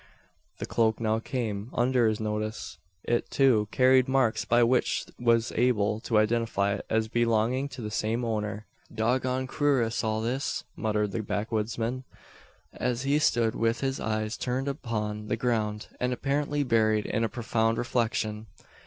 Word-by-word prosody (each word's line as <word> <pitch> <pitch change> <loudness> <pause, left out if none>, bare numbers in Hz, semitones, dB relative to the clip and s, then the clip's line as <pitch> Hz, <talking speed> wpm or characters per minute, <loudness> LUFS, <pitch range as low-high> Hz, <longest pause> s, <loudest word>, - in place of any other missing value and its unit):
The - - -4
cloak 110 -1 +1
now 110 -1 +1
came 115 -3 -3
under 125 -1 +3
his 110 -1 0
notice. 110 -4 -4 0.2
It, 120 0 0
too, 120 -7 +3
carried 130 +1 +4
marks, 130 -4 +1
by 120 0 +4
which 125 +2 +1
he - - -9
was 115 -1 +3
able 110 -3 +1
to 110 0 0
identify 110 -2 +1
it 100 - -6
as 110 0 +1
belonging 120 +4 +1
to 125 -2 -8
the 105 - -4
same 115 +3 -1
owner. 105 -2 -3 0.3
"Dog 115 +4 +1
goned 130 0 -2
kewrious, 130 -7 +1
all 110 0 0
this!" 125 +5 -2
muttered 105 -2 -1
the 110 - -2
backwoodsman, 115 +4 -2 0.7
as 125 0 -2
he 140 +2 +2
stood 115 -6 +2
with 115 0 0
his 135 -1 -1
eyes 110 0 -2
turned 130 +2 -2
upon 105 -6 -3
the 110 - -1
ground, 110 -3 -1
and 125 0 0
apparently 145 +3 0
buried 110 -4 +2
in 110 - -1
a 115 - 0
profound 115 -2 0
reflection. 110 -3 -1
115 Hz, 160 wpm, -28 LUFS, 110-125 Hz, 0.7 s, carried